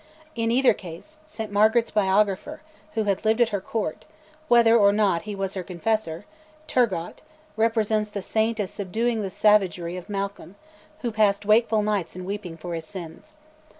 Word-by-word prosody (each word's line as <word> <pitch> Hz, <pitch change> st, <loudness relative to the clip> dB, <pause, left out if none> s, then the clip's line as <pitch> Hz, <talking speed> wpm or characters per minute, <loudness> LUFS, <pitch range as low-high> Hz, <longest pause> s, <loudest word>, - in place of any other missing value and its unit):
In 230 Hz, -3 st, -1 dB
either 250 Hz, +1 st, +4 dB
case, 195 Hz, -, -11 dB
St 225 Hz, -9 st, -7 dB
Margaret's 220 Hz, +3 st, +3 dB
biographer, 205 Hz, +8 st, +1 dB, 0.3 s
who 220 Hz, -, +1 dB
had 200 Hz, -1 st, -1 dB
lived 220 Hz, +2 st, +2 dB
at 240 Hz, -2 st, +4 dB
her 200 Hz, -3 st, -2 dB
Court, 210 Hz, -, -4 dB, 0.4 s
whether 235 Hz, -3 st, +6 dB
or 200 Hz, -3 st, +6 dB
not 200 Hz, -5 st, +2 dB
he 205 Hz, -, -4 dB
was 195 Hz, 0 st, -3 dB
her 190 Hz, -, -3 dB
Confessor, 180 Hz, -1 st, -2 dB, 0.4 s
Turgot, 205 Hz, -, -1 dB, 0.3 s
represents 220 Hz, -1 st, +1 dB
the 200 Hz, -2 st, -5 dB
Saint 220 Hz, +2 st, 0 dB
as 200 Hz, -3 st, -2 dB
subduing 220 Hz, +4 st, -1 dB
the 195 Hz, -, -3 dB
savagery 185 Hz, -4 st, +2 dB
of 180 Hz, +3 st, -10 dB
Malcolm, 200 Hz, -1 st, -5 dB, 0.5 s
who 240 Hz, -, -2 dB
passed 210 Hz, -2 st, +2 dB
wakeful 215 Hz, 0 st, +3 dB
nights 205 Hz, -6 st, -1 dB
in 180 Hz, 0 st, -7 dB
weeping 190 Hz, -4 st, -5 dB
for 175 Hz, +1 st, -6 dB
his 165 Hz, -1 st, -5 dB
sins. 185 Hz, -, -10 dB
210 Hz, 165 wpm, -24 LUFS, 190-225 Hz, 0.5 s, whether